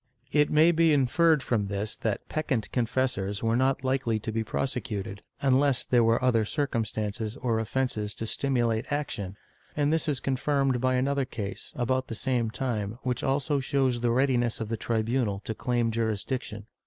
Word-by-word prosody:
^ -, -, -44 dB
It 150 Hz, -1 st, +3 dB
may 155 Hz, +3 st, +5 dB
be 165 Hz, -1 st, +4 dB
inferred 150 Hz, +2 st, +3 dB
from 105 Hz, -5 st, 0 dB
this 100 Hz, +2 st, -3 dB
that 110 Hz, -3 st, -2 dB
peccant 135 Hz, -8 st, -2 dB
confessors 115 Hz, -5 st, -1 dB
were 115 Hz, 0 st, +2 dB
not 130 Hz, +2 st, +1 dB
likely 130 Hz, -4 st, +1 dB
to 110 Hz, -, -3 dB
be 110 Hz, 0 st, -1 dB
prosecuted, 110 Hz, -5 st, -3 dB, 0.2 s
unless 135 Hz, 0 st, +3 dB
there 120 Hz, -2 st, +3 dB
were 115 Hz, +2 st, +2 dB
other 115 Hz, -3 st, +3 dB
circumstances 110 Hz, -4 st, -2 dB
or 115 Hz, -3 st, 0 dB
offences 110 Hz, -3 st, -2 dB
to 115 Hz, -, -4 dB
stimulate 120 Hz, -2 st, 0 dB
action, 105 Hz, -10 st, -3 dB, 0.4 s
and 145 Hz, +1 st, +2 dB
this 160 Hz, 0 st, +1 dB
is 145 Hz, -4 st, 0 dB
confirmed 135 Hz, -1 st, 0 dB
by 130 Hz, 0 st, +2 dB
another 135 Hz, +1 st, +1 dB
case, 100 Hz, -5 st, -6 dB
about 130 Hz, +1 st, 0 dB
the 115 Hz, -, -5 dB
same 120 Hz, -1 st, 0 dB
time, 110 Hz, -3 st, -3 dB
which 125 Hz, -1 st, -1 dB
also 140 Hz, +2 st, +1 dB
shows 135 Hz, -2 st, +1 dB
the 120 Hz, 0 st, +1 dB
readiness 120 Hz, -2 st, +2 dB
of 110 Hz, -2 st, -4 dB
the 115 Hz, -, -1 dB
tribunal 115 Hz, -2 st, 0 dB
to 110 Hz, -, -4 dB
claim 120 Hz, 0 st, 0 dB
jurisdiction. 110 Hz, 0 st, -2 dB
125 Hz, 170 wpm, -28 LUFS, 110-135 Hz, 0.4 s, may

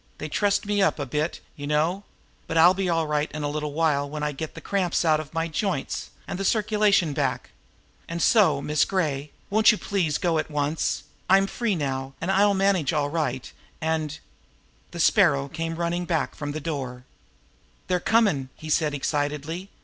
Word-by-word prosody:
"They 150 Hz, -, -5 dB
trussed 205 Hz, +4 st, +1 dB
me 205 Hz, 0 st, +1 dB
up 190 Hz, -, +2 dB
a 145 Hz, -, -3 dB
bit, 150 Hz, +5 st, -2 dB
you 145 Hz, -2 st, -6 dB
know 155 Hz, +6 st, +1 dB, 0.5 s
but 160 Hz, -, -2 dB
I'll 175 Hz, +3 st, +7 dB
be 190 Hz, -1 st, -1 dB
all 165 Hz, -1 st, +1 dB
right 150 Hz, 0 st, -1 dB
in 155 Hz, -1 st, -4 dB
a -, -, 0 dB
little 150 Hz, 0 st, -3 dB
while 145 Hz, -2 st, +1 dB
when 150 Hz, +1 st, -5 dB
I 150 Hz, -, 0 dB
get 150 Hz, +2 st, -6 dB
the -, -, -7 dB
cramps 185 Hz, -3 st, 0 dB
out 155 Hz, -1 st, +4 dB
of 155 Hz, -1 st, -7 dB
my 165 Hz, 0 st, 0 dB
joints 165 Hz, -2 st, -2 dB, 0.2 s
and -, -, -4 dB
the -, -, -1 dB
circulation 210 Hz, -5 st, +2 dB
back. 135 Hz, -3 st, -2 dB, 0.6 s
And 170 Hz, 0 st, -3 dB
so, 165 Hz, -8 st, +4 dB
Miss 150 Hz, +1 st, +2 dB
Gray, 150 Hz, -6 st, -1 dB, 0.2 s
won't 220 Hz, +2 st, +6 dB
you 215 Hz, -, -1 dB
please 175 Hz, -9 st, 0 dB
go 165 Hz, -3 st, +1 dB
at -, -, -3 dB
once? 150 Hz, +1 st, -1 dB, 0.3 s
I'm 195 Hz, +1 st, +6 dB
free 215 Hz, +1 st, -1 dB
now, 135 Hz, -3 st, -3 dB
and 175 Hz, +3 st, -1 dB
I'll 200 Hz, +1 st, +4 dB
manage 190 Hz, -5 st, +2 dB
all 145 Hz, -2 st, 0 dB
right, 135 Hz, -6 st, -2 dB, 0.3 s
and 155 Hz, -2 st, -1 dB, 0.4 s
" -, -, -35 dB
The -, -, -8 dB
Sparrow 70 Hz, 0 st, +4 dB
came 165 Hz, -, -4 dB
running 170 Hz, +1 st, -1 dB
back 165 Hz, -4 st, -1 dB
from 145 Hz, -1 st, -5 dB
the 155 Hz, -, -4 dB
door. 135 Hz, -5 st, -4 dB, 0.8 s
"They're 180 Hz, -1 st, 0 dB
comm'!" 195 Hz, -, +2 dB
he 155 Hz, 0 st, -7 dB
said 150 Hz, -2 st, +2 dB
excitedly. 150 Hz, +5 st, -2 dB
160 Hz, 190 wpm, -25 LUFS, 145-185 Hz, 0.8 s, I'll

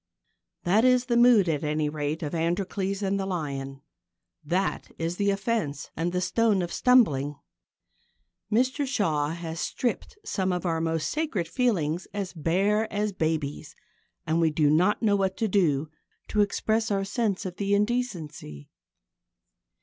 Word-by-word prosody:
That 200 Hz, +6 st, +3 dB
is 250 Hz, -1 st, +4 dB
the 240 Hz, -2 st, 0 dB
mood, 240 Hz, -5 st, +6 dB
at 155 Hz, -3 st, 0 dB
any 150 Hz, 0 st, 0 dB
rate, 150 Hz, +1 st, -3 dB
of 150 Hz, -, -4 dB
Androcles 190 Hz, +4 st, -1 dB
and 195 Hz, 0 st, 0 dB
the 195 Hz, -, -2 dB
Lion. 135 Hz, -6 st, -4 dB, 0.6 s
That 180 Hz, +6 st, -1 dB
is 165 Hz, +2 st, -2 dB
the 200 Hz, 0 st, +1 dB
offence 195 Hz, -, -2 dB
and 170 Hz, +2 st, -1 dB
the 180 Hz, 0 st, -1 dB
stone 210 Hz, 0 st, +2 dB
of 170 Hz, -, -5 dB
stumbling. 150 Hz, -, +3 dB, 1.2 s
Mr 260 Hz, +5 st, +1 dB
Shaw 160 Hz, -, 0 dB
has 165 Hz, 0 st, -5 dB
stripped 250 Hz, -, -2 dB
some 190 Hz, -2 st, -1 dB
of 180 Hz, 0 st, -2 dB
our 165 Hz, -2 st, 0 dB
most 165 Hz, -1 st, -1 dB
sacred 290 Hz, -, -2 dB
feelings 180 Hz, -, 0 dB
as 200 Hz, -3 st, -3 dB
bare 195 Hz, +7 st, +1 dB
as 210 Hz, 0 st, -1 dB
babies, 155 Hz, -2 st, -2 dB, 0.5 s
and 165 Hz, +1 st, +1 dB
we 165 Hz, -, +4 dB
do 150 Hz, -1 st, +2 dB
not 180 Hz, +9 st, +2 dB
know 205 Hz, -2 st, +4 dB
what 190 Hz, -1 st, 0 dB
to 225 Hz, -, 0 dB
do 160 Hz, -7 st, +2 dB, 0.4 s
to 210 Hz, -, +2 dB
express 220 Hz, +2 st, 0 dB
our 195 Hz, -1 st, 0 dB
sense 210 Hz, -2 st, -1 dB
of 180 Hz, -1 st, -5 dB
the 200 Hz, 0 st, +1 dB
indecency. 180 Hz, -, -3 dB
185 Hz, 150 wpm, -27 LUFS, 160-210 Hz, 1.2 s, mood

